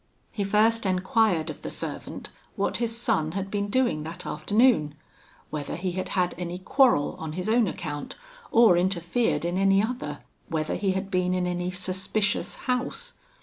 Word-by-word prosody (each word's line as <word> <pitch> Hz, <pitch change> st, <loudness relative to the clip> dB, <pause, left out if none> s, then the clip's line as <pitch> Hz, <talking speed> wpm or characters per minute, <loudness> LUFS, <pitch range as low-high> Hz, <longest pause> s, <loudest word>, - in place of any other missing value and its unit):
He 205 Hz, -, -2 dB
first 215 Hz, +2 st, +3 dB
enquired 185 Hz, -2 st, +2 dB
of -, -, -12 dB
the -, -, -5 dB
servant -, -, -6 dB, 0.3 s
what -, -, 0 dB
his 230 Hz, -1 st, -1 dB
son 195 Hz, -10 st, 0 dB
had 195 Hz, 0 st, -3 dB
been 205 Hz, -1 st, -1 dB
doing 240 Hz, -8 st, +1 dB
that 165 Hz, +3 st, -7 dB
afternoon; 180 Hz, -, +2 dB, 0.6 s
whether 150 Hz, -2 st, -4 dB
he 180 Hz, +1 st, -2 dB
had 185 Hz, +1 st, -3 dB
had 180 Hz, -1 st, +2 dB
any 175 Hz, 0 st, -4 dB
quarrel 190 Hz, -, +3 dB
on 160 Hz, -1 st, -5 dB
his 180 Hz, +3 st, -4 dB
own 225 Hz, 0 st, +3 dB
account, 145 Hz, -4 st, -5 dB, 0.4 s
or 225 Hz, -6 st, +6 dB
interfered 180 Hz, +3 st, +1 dB
in 175 Hz, +2 st, 0 dB
any 195 Hz, 0 st, +4 dB
other; 185 Hz, -, -4 dB, 0.3 s
whether 155 Hz, -1 st, -1 dB
he 195 Hz, -2 st, 0 dB
had 190 Hz, +1 st, -3 dB
been 180 Hz, -1 st, +1 dB
in 180 Hz, -1 st, 0 dB
any 180 Hz, 0 st, -1 dB
suspicious 190 Hz, +3 st, -1 dB
house. 365 Hz, -, -2 dB
190 Hz, 165 wpm, -26 LUFS, 175-220 Hz, 0.6 s, or